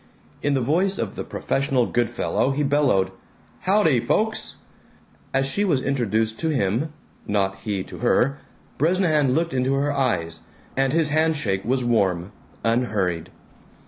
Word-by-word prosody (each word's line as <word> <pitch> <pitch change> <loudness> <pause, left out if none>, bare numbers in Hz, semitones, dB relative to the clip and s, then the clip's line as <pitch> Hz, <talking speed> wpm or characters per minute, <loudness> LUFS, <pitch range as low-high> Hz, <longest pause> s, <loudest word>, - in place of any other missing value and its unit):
In 145 -1 +1
the 135 - +1
voice 180 +10 +2
of 110 -4 -3
the - - -4
professional 135 -3 0
Good 120 -1 0
Fellow 120 +2 0
he 140 +2 0
bellowed, 135 -10 +2 0.5
"Howdy, 185 - +3
folks!" 220 - 0 0.8
As 135 0 +1
she 200 +9 0
was 170 -10 +2
introduced 110 -5 0
to 165 - 0
him 130 +2 0 0.4
(not 95 -2 0
he 95 -1 -3
to - - -10
her) 135 +3 +2 0.4
Bresnahan 155 -5 +2
looked 165 +1 0
into 130 +1 +1
her 145 +1 +1
eyes, 85 - -1 0.4
and 135 0 +2
his 160 0 +2
hand 160 +2 +2
shake 95 -10 -1
was 130 +2 0
warm, 95 -6 +1 0.3
unhurried. 105 -8 0
130 Hz, 145 wpm, -23 LUFS, 110-150 Hz, 0.8 s, Howdy